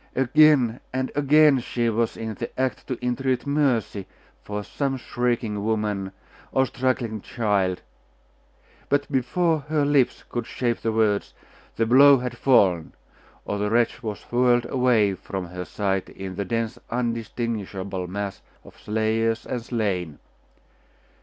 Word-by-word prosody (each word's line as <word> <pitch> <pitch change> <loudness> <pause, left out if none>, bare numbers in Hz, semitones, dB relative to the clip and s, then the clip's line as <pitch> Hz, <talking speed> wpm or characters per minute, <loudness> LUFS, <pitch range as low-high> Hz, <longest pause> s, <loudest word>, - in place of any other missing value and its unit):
Again 135 -2 +4
and 130 0 -2
again 145 0 +5
she 120 0 -2
was 115 0 0
in 110 -1 -4
the 120 - -5
act 130 -4 -1
to 130 - -3
entreat 130 +1 0
mercy 130 -9 0 0.3
for 105 0 -5
some 135 +4 -2
shrieking 120 -4 -2
woman 105 -3 -1 0.4
or 130 - +3
struggling 125 -5 -1
child; 100 -6 -1 1.1
but 145 +1 0
before 155 +5 +1
her 150 -2 +2
lips 140 -3 +2
could 120 -2 -4
shape 120 -2 -1
the 115 - -1
words, 110 -2 +1 0.4
the 115 - +1
blow 140 +4 +7
had 125 -1 -4
fallen, 95 -12 +3 0.5
or 100 - -3
the 105 0 0
wretch 115 +2 +1
was 110 -3 -5
whirled 120 0 +3
away 120 -6 +3
from 95 0 -5
her 90 0 -6
sight 95 -1 -2
in 95 -1 -7
the 100 +2 -3
dense 115 +4 -2
undistinguishable 115 -5 -3
mass 100 +1 -5 0.2
of - - -16
slayers 110 +1 0
and 125 - -3
slain. 95 - -2
115 Hz, 135 wpm, -24 LUFS, 105-130 Hz, 1.1 s, blow